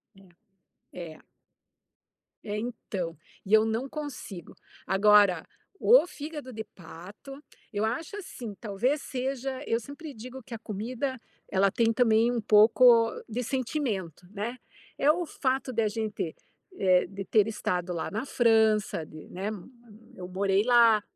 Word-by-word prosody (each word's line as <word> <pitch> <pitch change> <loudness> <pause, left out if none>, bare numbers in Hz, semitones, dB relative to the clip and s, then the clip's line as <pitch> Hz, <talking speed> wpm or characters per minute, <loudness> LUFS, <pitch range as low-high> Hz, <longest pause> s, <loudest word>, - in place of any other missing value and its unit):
Eh, 195 -2 -19 0.6
eh. 170 -3 -8 1.2
É, 210 0 -4
então, 195 -8 -4 0.3
e 205 - -3
eu 220 0 +7
não 230 +5 -2
consigo. 255 - -7 0.3
Agora, 200 0 +5 0.3
o - - +6
fígado 295 -4 -7
de 220 0 -5
pato, 195 - -11 0.3
eu 210 +1 0
acho 310 - -3
assim, 240 - -7
talvez, 240 +7 -1
seja 265 0 -3
eu 230 - +1
sempre 285 +5 -9
digo 255 +4 -9
que 235 - -10
a 225 - -5
comida 240 +5 -4 0.3
ela 195 0 +3
tem 230 -1 +2
também 230 0 +3
um 235 -2 -1
pouco 230 +2 +6 0.2
de 240 +2 -3
sentimento, 230 - -3
né, 220 +5 -4 0.4
é 290 +2 +5
o 350 +2 -2
fato 265 -3 -1
da 225 -1 +2
gente, 215 -6 -3 0.4
eh, 185 -2 +3
de 195 +1 -7
ter 210 +2 +3
estado 180 -4 -2
lá 165 - -3
na 220 +5 -3
França, 220 - +2
de, 155 0 -12
né, 190 +3 -5
m 210 -4 -5 0.5
eu 180 -1 -7
morei 195 +2 +1
lá. 230 -3 +5
220 Hz, 140 wpm, -28 LUFS, 195-255 Hz, 1.2 s, eu